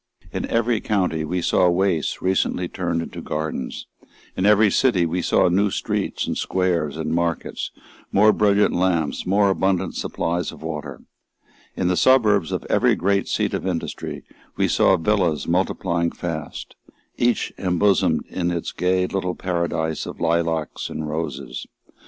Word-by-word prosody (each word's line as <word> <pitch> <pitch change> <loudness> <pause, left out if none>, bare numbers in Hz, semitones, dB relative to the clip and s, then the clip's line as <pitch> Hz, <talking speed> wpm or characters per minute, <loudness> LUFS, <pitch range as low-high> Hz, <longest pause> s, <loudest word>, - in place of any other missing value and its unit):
In - - -2
every 115 -1 +1
county, 90 -6 0
we 90 +3 -2
saw 90 +1 +3
wastes 90 -3 0
recently 90 -1 +1
turned 85 -2 -2
into - - -8
gardens; 75 -4 -4 0.5
in 95 - +1
every 105 -1 +5
city, 105 -10 +3
we 85 +2 -1
saw - - +3
new 100 +4 +2
streets, - - -2
and - - -2
squares, 85 -6 0
and 80 0 -2
markets, 85 0 -2 0.4
more 105 +2 +5
brilliant 105 -1 +3
lamps, 90 -4 0
more 100 +1 +3
abundant 95 -1 0
supplies 85 0 -2
of - - -13
water; 75 -4 -5 0.7
in 90 - 0
the 90 - +2
suburbs 105 - +4
of - - -3
every - - +3
great 100 +1 +1
seat - - 0
of - - -2
industry, 85 -3 -4 0.3
we - - +2
saw - - +4
villas 85 -3 +1
multiplying 85 -1 0
fast, 85 -4 -6 0.4
each 120 -1 +1
embosomed 95 +1 +2
in 90 -1 -2
its 85 -1 -3
gay 90 0 +1
little 90 -1 -2
paradise 85 -3 -2
of - - -8
lilacs 80 -2 -1
and 80 - -4
roses. 75 -4 -4
90 Hz, 145 wpm, -22 LUFS, 80-95 Hz, 0.7 s, every